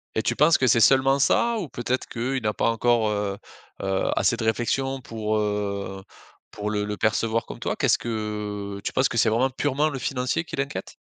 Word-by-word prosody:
Et - - +2
tu - - 0
penses 155 +2 +5
que 130 - +2
c'est 115 -1 +4
seulement 135 +4 +5
ça? 235 - +3
Ou 175 -8 -5
peut-être 125 +1 -2
qu'il 130 +2 -3
n'a 105 -1 0
pas - - +1
encore, 115 -1 +2
heu, 100 -1 -2 0.4
heu, 95 0 0
assez - - +2
de - - -5
réflexion 135 +4 0
pour, 110 -2 -2
heu, 100 -2 -2 0.5
pour 105 0 -4
le 105 -1 -1
le 105 0 -4
percevoir 115 +1 +1
comme - - -9
toi? - - -2
Qu'est-ce - - +3
que 105 -3 -4
tu - - -2
penses 130 - +2
que 115 - -5
c'est 110 - +4
vraiment 120 +5 +2
purement 145 +3 0
le 135 -3 -5
financier 130 +5 -1
qui 165 - -8
l'inquiète? 140 +1 -4
115 Hz, 205 wpm, -25 LUFS, 105-135 Hz, 0.5 s, penses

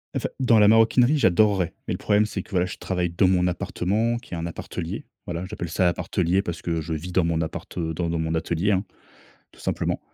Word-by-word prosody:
En - - +1
fait, - - -3
dans 120 -4 +5
la 105 - +6
maroquinerie, 115 +6 +5
j'adorerais, 95 - +3
mais - - -1
le - - -3
problème, 105 +1 +2
c'est 100 -3 -4
que, - - -20
voilà, 90 -2 +1
je - - -7
travaille 90 -2 -1
dans 85 +3 +2
mon 90 -1 +3
appartement 105 +6 0
qui 120 -5 -11
est - - -4
un 85 - -3
appartelier. 85 - -5 0.2
Voilà, 85 +1 -4
j'appelle 85 -2 -5
ça 90 +3 +1
l'appartelier 90 +1 +1
parce 85 -3 -5
que 85 -1 -1
je 80 +1 -4
vis 85 +4 -5
dans 95 - +3
mon 85 -1 0
appart, 80 - -6
heu, 80 -2 -1
dans 85 +1 -2
dans 85 0 -1
mon 80 0 -1
atelier, 85 +4 0
hein, 95 0 +1 0.7
tout - - -19
simplement. - - -1
90 Hz, 235 wpm, -24 LUFS, 85-105 Hz, 0.7 s, la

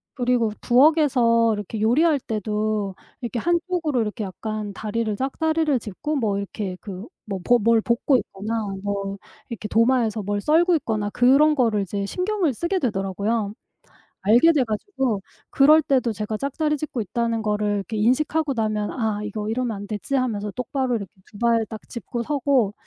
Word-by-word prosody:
그리고 245 -3 +1
부엌에서 245 -4 +4
이렇게 210 +1 -5
요리할 290 +7 +3
때도 215 -3 -2 0.3
이렇게 240 -1 -3
한쪽으로 340 -4 0
이렇게 215 +1 -3
약간 210 +2 -5
다리를 215 +1 -2
짝다리를 305 +2 0
짚고 290 +9 -4
뭐 210 -6 0
이렇게 200 -1 -4
그 195 +1 -8 0.2
뭐 195 -2 -3
보 245 0 +5
뭘 230 +1 +4
볶고 235 +4 +2
있거나 220 0 -4 0.2
뭐 200 -1 -3 0.3
이렇게 220 -3 -6
도마에서 230 -1 +2
뭘 205 +1 -2
썰고 335 - +4
있거나 215 -7 -2
그런 275 +6 +5
거를 225 -6 +2
이제 200 +1 -3
신경을 365 - 0
쓰게 340 - -1
되더라고요. 205 - -1 0.7
알게 235 +11 +6
돼 285 -4 +3
가지고 235 - -2 0.3
그럴 305 +3 +6
때도 255 -4 +1
제가 215 0 -3
짝다리 300 +3 -1
짚고 275 -5 -4
있다는 230 +2 -1
거를 210 -1 0
인식하고 275 +7 +1
나면 215 -2 -1
'아 220 -4 -2
이거 210 0 -4
이러면 235 -2 -1
안 200 - -7
되지?'하면서 215 -2 -2
똑바로 250 0 -1
이렇게 200 -4 -5 0.2
2 205 - -13
발을 230 -1 +2
딱 220 -1 -9
짚고 235 0 -5
서고 270 -6 +1
230 Hz, 345 characters per minute, -23 LUFS, 210-270 Hz, 0.7 s, 알게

